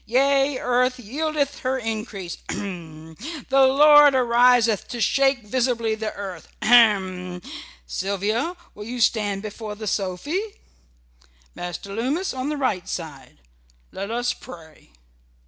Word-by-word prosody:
Yea, 275 +3 +2
earth 250 +1 +1
yieldeth 285 +4 -2
her 260 +1 -1
increase 215 -6 -5
h - - -3
m! 160 -5 -8 0.3
The 270 0 +5
Lord 295 +1 +7
ariseth 240 -3 +4
to 240 - -6
shake 270 +1 +2
visibly 230 0 0
the 220 0 -3
earth 190 -4 -7 0.2
ahem! 190 -6 +3 0.5
Sylvia, 205 - -2 0.2
will 210 - -9
you 245 +2 -5
stand 205 -3 +1
before 215 0 -6
the 215 +1 -7
sophy? 200 - -2 1.1
Master 175 +3 -6
Lummis 275 - -1
on 260 +2 -3
the 300 - -2
right 190 -9 -1
side. 155 -6 -7 0.5
Let 200 +2 -5
us 240 +1 -1
pray." 160 -3 -14
230 Hz, 125 wpm, -23 LUFS, 195-260 Hz, 1.1 s, Lord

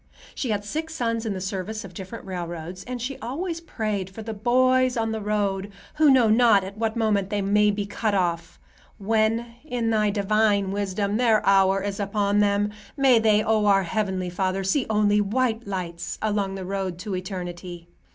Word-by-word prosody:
She 255 - -3
had 205 -1 -1
six 320 +7 -4
sons 230 -4 -1
in 210 - -1
the - - -4
service 195 +3 -4
of 185 - -11
different 190 +6 -8
railroads, 175 -1 -6
and 250 0 -5
she 255 +3 -4
always 335 +7 -4
prayed 215 - -3
"for 220 +4 -9
the 225 0 -5
boys 255 +3 +2
on 225 -1 0
the 220 -1 -3
road, 205 -1 -1 0.3
who 310 -1 +5
know 260 -4 +5
not 220 -3 +5
at 195 +1 -7
what 220 +1 -1
moment 210 -4 +1
they 205 -1 -1
may 210 +1 +3
be 205 0 -1
cut 205 +1 -1
off. 170 -2 -1 0.4
When, 225 +2 0
in 245 -6 -1
Thy 215 -1 +2
divine 205 -1 +1
wisdom, 200 +1 -1
their 230 -3 +3
hour 195 0 +4
is 200 0 -3
upon 205 0 +1
them, 205 0 +2 0.3
may 265 -4 +5
they, 215 -1 +3
O 215 -1 +2
our 195 -1 +4
Heavenly 185 -1 -2
Father, 190 +1 -1
see 220 +8 0
only 210 -1 +3
white 225 +1 0
lights 175 -3 -4
along 205 -2 -1
the 190 -1 -6
road 190 -2 -3
to 190 +2 -4
Eternity." 180 -2 -6
205 Hz, 185 wpm, -24 LUFS, 195-225 Hz, 0.4 s, who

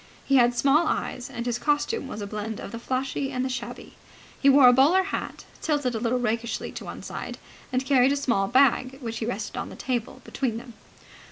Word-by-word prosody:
He 275 - +4
had 240 -1 +4
small 295 +5 +4
eyes, 250 0 -2
and 240 -3 -5
his 240 -1 -1
costume 295 - 0
was 215 -5 -6
a - - -3
blend 210 +1 -5
of - - -7
the 230 - -6
flashy 265 +2 -2
and 255 -1 -1
the - - -2
shabby. 260 - -6 0.5
He 280 - +6
wore 275 -1 +8
a 245 - +8
bowler 305 +9 +5
hat, 395 - -5 0.2
tilted 290 -5 0
a 225 - -2
little 235 +2 0
rakishly 235 -1 -2
to - - -8
one - - -8
side, - - -6 0.3
and 255 +1 0
carried 265 -1 +4
a - - +2
small 235 -8 +1
bag, 255 +1 +3
which 230 -4 -5
he 225 - -3
rested 245 - -4
on - - -4
the - - -10
table 250 0 -3
between 245 -5 -2
them. 240 0 -10
255 Hz, 215 wpm, -26 LUFS, 235-275 Hz, 0.5 s, wore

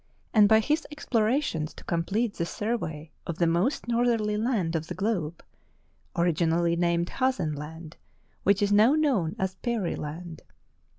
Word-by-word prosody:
and 210 -2 +6
by 220 0 +7
his 300 +8 0
explorations 230 - 0
to - - -12
com 165 -1 -1
plete 215 +4 -1
the 170 - -1
survey 170 -10 -3 0.2
of 170 - -3
the 170 - +2
most 175 - +1
northerly 230 -3 +1
land 210 -7 0
of 160 0 -2
the - - -5
globe 180 -7 -2 0.4
— - - -40
originally 170 0 +2
named 170 0 +1
Hazen 255 - 0
Land, 155 +2 -8 0.4
which 200 +1 +3
is 205 - +1
now 215 +6 +6
known 255 - +1
as 190 -1 -1
Peary 225 -7 -1
Land. 160 +2 -7
190 Hz, 160 wpm, -27 LUFS, 165-230 Hz, 0.4 s, by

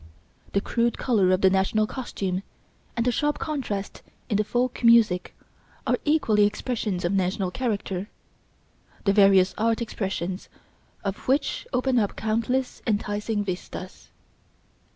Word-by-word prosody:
The 200 - +2
crude 235 +2 0
colour 210 -8 +2
of 185 +1 +2
the 190 - +6
national 195 +3 +2
costume 195 -7 -3 0.6
and 230 - +1
the 250 - +3
sharp 295 +5 0
contrast 240 -10 -4 0.3
in 205 - +2
the 210 - +2
folk 245 +3 -1
music 230 -6 +4 0.5
are - - +1
equally 265 -9 +3
expressions 210 -4 -2
of 175 - +1
national 190 0 0
character, 205 -4 -2 1.0
the 200 - +4
various 195 -2 +5
art 225 +1 +2
expressions 190 -5 -3 0.5
of 195 -1 -4
which 280 - 0
open 255 0 +2
up 205 -3 -1
countless 230 +4 -1
enticing 210 0 -1
vistas. 185 0 -6
210 Hz, 130 wpm, -25 LUFS, 195-235 Hz, 1.0 s, the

